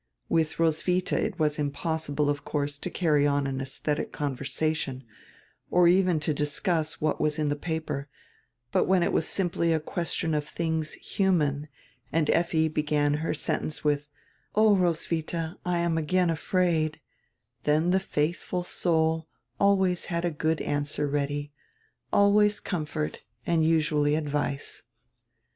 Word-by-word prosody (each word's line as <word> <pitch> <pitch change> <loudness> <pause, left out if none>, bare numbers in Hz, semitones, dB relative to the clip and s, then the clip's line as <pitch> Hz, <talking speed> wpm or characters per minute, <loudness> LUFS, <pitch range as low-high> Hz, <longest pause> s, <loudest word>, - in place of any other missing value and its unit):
Widi 160 -1 +1
Roswitha 165 +3 +1
it 215 -2 -1
was 150 -1 +1
impossible, 150 0 -1
of 145 -1 -1
course, 145 -1 -2
to 180 - -4
carry 150 -5 +2
on 145 -1 +1
an 135 -1 -2
esdietic 140 +2 -2
conversation, 140 0 -2 0.7
or 175 -1 +5
even 180 -2 +4
to 155 +1 +1
discuss 155 +2 -1
what 155 0 0
was 150 0 +1
in 150 -1 0
die 145 - 0
paper, 150 -3 -4 0.6
but - - +3
when 185 -2 +3
it - - 0
was 155 - +2
simply 170 -3 +1
a 160 - +2
question 160 0 -2
of 150 -1 0
tilings 160 -2 -1
human 150 -7 0 0.4
and 155 -2 +2
Effi 165 -2 +2
began 150 -1 +1
her 160 - -1
sentence 155 0 -2
with, 145 0 0 0.5
"Oh, 215 -1 +6
Roswitha, 165 -2 -1
I 180 -1 0
am 170 -1 +1
again 175 +2 +2
afraid," 165 -2 0 0.7
then 155 +4 +3
the 190 - +4
faithful 175 +1 -2
soul 160 -2 0 0.3
always 190 -3 +3
had 170 0 -2
a 175 - +1
good 155 +1 0
answer 145 0 -1
ready, 145 0 -2 0.6
always 205 +1 +4
comfort 155 -3 -3 0.2
and 165 -2 +2
usually 155 -2 +2
advice. 145 -2 -2
160 Hz, 140 wpm, -27 LUFS, 150-170 Hz, 0.7 s, Oh